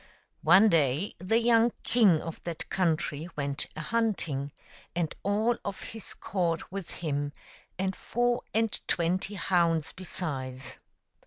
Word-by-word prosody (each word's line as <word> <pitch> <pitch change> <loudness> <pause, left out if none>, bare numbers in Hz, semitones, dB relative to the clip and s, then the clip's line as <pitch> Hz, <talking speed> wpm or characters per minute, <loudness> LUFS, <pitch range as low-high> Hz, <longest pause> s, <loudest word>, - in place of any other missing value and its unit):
One 215 +3 +7
day 155 0 +2
the 185 +6 +2
young 235 0 +4
king 205 -10 +4
of 165 -1 -7
that 170 -2 -4
country 165 -3 0
went 140 -1 -1
a 155 - -4
hunting, 165 -9 -1 0.4
and 170 -3 0
all 215 +4 +2
of 200 -1 -4
his 225 -3 -7
court 175 -4 -1
with 195 -3 -5
him, 145 -3 -2 0.4
and 190 0 -1
four 240 +1 0
and 225 0 +2 0.2
twenty 185 +4 +1
hounds 165 -4 +2
besides. 130 -9 -4
175 Hz, 130 wpm, -29 LUFS, 155-210 Hz, 0.4 s, One